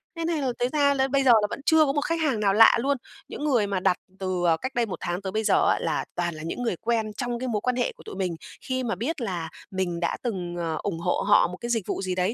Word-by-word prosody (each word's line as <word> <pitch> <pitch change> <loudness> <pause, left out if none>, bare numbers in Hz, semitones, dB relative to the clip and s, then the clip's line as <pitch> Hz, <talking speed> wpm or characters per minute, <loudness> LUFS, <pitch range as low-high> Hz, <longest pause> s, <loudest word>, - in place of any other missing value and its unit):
nên 330 0 -2
thành 320 -4 0
là 260 -2 0
thế 245 - +2
ra 285 -1 +4
là 265 -1 +1
bây 275 0 +1
giờ 255 - +6
là 210 - +1
vẫn - - -5
chưa 320 -1 +5
có 275 - 0
một 290 - 0
khách 330 +2 -1
hàng 270 -8 +1
nào 200 -2 +2
lạ 225 +2 +7
luôn. 275 +2 +1 0.3
Những 295 - -7
người 240 -8 +2
mà 195 -2 -1
đặt 185 -1 +2 0.2
từ, 185 -2 -2
à, 165 -1 +4
cách 260 +1 -4
đây 240 -1 +2
1 200 - -6
tháng 175 +2 -2
tới 190 -1 -4
bây 220 +1 -1
giờ - - +3
á - - +2
là - - -1
toàn 175 -2 -1
là 155 - -8
những 205 +9 -4
người 225 -7 0
quen 220 -2 0
trong 240 +1 -3
cái 255 - -3
mối 215 -4 -1
quan 250 -1 0
hệ 245 - 0
của - - -16
tụi - - -8
mình, 185 -3 -2 0.3
khi 260 0 -2
mà 225 -6 -1
biết 265 - -3
là 175 -7 -3 0.2
mình 180 -3 -2
đã 170 - -1
từng, 180 -7 -3
ờ, 165 -2 -2
ủng 170 -5 -2
hộ 175 +1 0
họ 205 - +6
một 180 +1 -8
cái 235 - -4
dịch 225 -5 0
vụ - - -2
gì 185 -1 -2
đấy 185 +4 0
220 Hz, 305 wpm, -26 LUFS, 180-260 Hz, 0.3 s, lạ